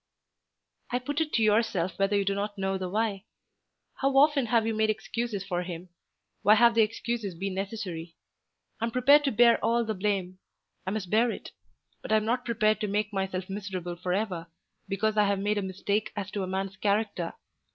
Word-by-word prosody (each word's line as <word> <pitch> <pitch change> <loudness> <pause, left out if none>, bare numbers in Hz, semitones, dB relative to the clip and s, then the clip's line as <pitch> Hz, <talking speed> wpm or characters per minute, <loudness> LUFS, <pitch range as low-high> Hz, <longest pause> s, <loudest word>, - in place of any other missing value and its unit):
"I 245 - 0
put 290 +5 -2
it 310 -1 -1
to 225 - +3
yourself 210 -5 +1
whether 195 +1 +2
you 200 - +1
do 200 - +1
not 205 +1 -3
know 195 0 -1
the 185 -1 -3
why. 210 0 -1 0.7
How 270 0 +1
often 285 -3 +5
have 225 -1 +2
you 225 - 0
made 220 0 +1
excuses 220 -1 -2
for 180 -2 -2
him? 180 0 -7 0.5
Why 210 +2 +6
have 235 +1 +6
the 230 - +4
excuses 220 -2 -2
been 195 +3 -3
necessary? 185 -4 -5 0.6
I 225 - 0
am - - -1
prepared 265 +5 +5
to 275 - +2
bear 235 +1 +5
all 235 0 +2
the 220 - -1
blame. 190 -2 -2 0.5
I - - +2
must 195 -3 -4
bear 230 +3 +4
it. - - -6 0.5
But - - -7
I - - +5
am 215 - -1
not 245 +3 0
prepared 215 -2 +1
to 210 - 0
make 210 +1 -1
myself 190 -1 -2
miserable 190 -3 -5
for 180 +1 -4
ever 180 -4 -2 0.4
because 215 +2 0
I 210 - +5
have 200 0 +1
made 205 +2 0
a - - -1
mistake 200 +2 -2
as 205 -1 -4
to 205 - -3
a 185 - -2
man's 190 +1 -3
character. 200 -4 -1
205 Hz, 205 wpm, -28 LUFS, 190-225 Hz, 0.7 s, Why